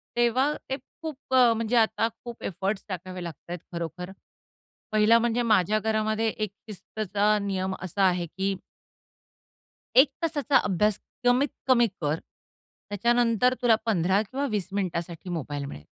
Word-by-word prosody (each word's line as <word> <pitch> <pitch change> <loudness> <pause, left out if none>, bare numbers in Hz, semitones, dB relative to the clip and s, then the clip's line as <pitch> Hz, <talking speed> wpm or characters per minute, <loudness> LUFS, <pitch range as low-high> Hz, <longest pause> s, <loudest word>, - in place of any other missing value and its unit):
तेव्हा 240 +4 +3 0.2
ते 265 - -1 0.2
खूप 315 -4 -5 0.2
अ, 245 -3 +6
म्हणजे 230 +1 -1
आता 225 0 +3 0.2
खूप 240 -1 -8
एफोर्ट्स 195 +2 -2
टाकावे 185 0 -5
लागतायत 170 +2 -7
खरोखर. 170 +2 -5 0.8
पहिला 215 +2 +5
म्हणजे 235 +1 +1
माझ्या 215 -2 +3
घरामध्ये 215 0 0
एक 215 -1 -3 0.2
शिस्तचा 210 +1 0
नियम 190 -1 -2
असा 190 +2 -1
आहे 180 -1 0
की 195 +3 -2 1.4
1 265 +3 +9 0.2
तासाचा 290 -4 +2
अभ्यास 205 +2 +1 0.3
कमीत 250 +3 +4 0.2
कमी 240 -2 +5
कर. 150 +1 +1 0.7
त्याच्यानंतर 235 +3 +2
तुला 235 -2 +5
15 190 -2 +2
किंवा 260 +7 -3
20 200 -4 -1
मिनिटासाठी 180 -3 -3
मोबाईल 145 -4 -3
मिळेल. 75 - -9
210 Hz, 130 wpm, -26 LUFS, 185-235 Hz, 1.4 s, 1